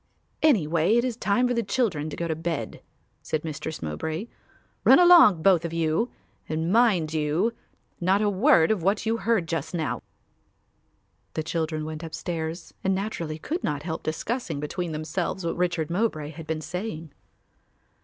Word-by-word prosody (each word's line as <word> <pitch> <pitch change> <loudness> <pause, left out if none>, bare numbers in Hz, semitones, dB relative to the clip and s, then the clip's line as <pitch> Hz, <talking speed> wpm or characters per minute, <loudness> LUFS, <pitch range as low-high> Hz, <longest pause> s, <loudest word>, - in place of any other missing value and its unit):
"Anyway 175 - +3
it 240 - +3
is 250 -3 -2
time 240 +2 +1
for 245 - 0
the 235 - +1
children 195 - -1
to - - -6
go 170 - -3
to 160 - 0
bed," 160 -8 -4 0.4
said 155 - -2
Mistress 155 - -5
Mowbray. 155 - -3 0.6
"Run - - +8
along, 340 - +7
both 180 -3 +5
of 170 -1 -4
you, 165 +8 +1 0.4
and, 160 +3 -1
mind 200 -10 +3
you, 160 +9 +1 0.5
not 185 +3 +3
a 210 - +2
word 205 - +4
of 210 -5 0
what 195 +5 +1
you 225 +1 +1
heard 220 -7 +1
just 165 +1 -3
now." 160 -3 -2 1.3
The 155 - -1
children 155 -1 -2
went 155 0 -6
upstairs 165 0 -5
and 190 0 +2
naturally 170 -6 -3
could 325 - -4
not 145 -2 -2
help 160 -1 -4
discussing 160 - -3
between 165 +4 -3
themselves 165 +4 -3
what 165 - -1
Richard 175 -3 -1
Mowbray 170 -6 -1
had 160 0 -10
been 160 -1 -2
saying. 160 -1 -5
170 Hz, 165 wpm, -26 LUFS, 155-205 Hz, 1.3 s, Run